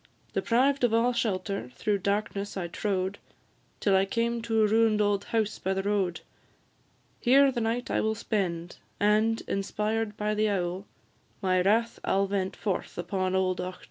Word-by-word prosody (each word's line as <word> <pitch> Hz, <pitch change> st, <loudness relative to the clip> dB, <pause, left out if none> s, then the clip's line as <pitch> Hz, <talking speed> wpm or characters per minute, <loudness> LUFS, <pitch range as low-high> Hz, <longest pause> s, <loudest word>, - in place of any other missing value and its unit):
Deprived 265 Hz, +4 st, +2 dB
of 230 Hz, -2 st, +3 dB
all 240 Hz, +2 st, +3 dB
shelter, 195 Hz, -, -2 dB
through 205 Hz, -2 st, 0 dB
darkness 200 Hz, 0 st, -2 dB
I 175 Hz, -2 st, -2 dB
trode, 190 Hz, +1 st, -2 dB, 0.6 s
Till 200 Hz, -2 st, +3 dB
I 190 Hz, +1 st, +4 dB
came 230 Hz, +3 st, -1 dB
to 225 Hz, -1 st, +1 dB
a -, -, +4 dB
ruin'd 220 Hz, 0 st, +3 dB
old 205 Hz, -1 st, +1 dB
house 220 Hz, -2 st, -1 dB
by 190 Hz, +1 st, -1 dB
the 195 Hz, -, -1 dB
road; 195 Hz, -4 st, 0 dB, 1.0 s
Here 270 Hz, +2 st, +5 dB
the 240 Hz, -2 st, -2 dB
night 230 Hz, +2 st, -1 dB
I -, -, +1 dB
will 220 Hz, 0 st, 0 dB
spend, 175 Hz, -6 st, -2 dB, 0.2 s
and, 215 Hz, +2 st, +3 dB
inspired 210 Hz, +2 st, -2 dB
by 210 Hz, 0 st, 0 dB
the 215 Hz, 0 st, +1 dB
owl, 185 Hz, 0 st, -2 dB, 0.5 s
My 185 Hz, -2 st, +2 dB
wrath 225 Hz, +5 st, +2 dB
I -, -, 0 dB
'll 195 Hz, +1 st, +3 dB
vent 195 Hz, -1 st, -2 dB
forth 195 Hz, -4 st, -3 dB
upon 185 Hz, +1 st, -1 dB
old 185 Hz, -1 st, +1 dB
Auchtertool. 180 Hz, 0 st, -4 dB
205 Hz, 170 wpm, -28 LUFS, 190-225 Hz, 1.0 s, Here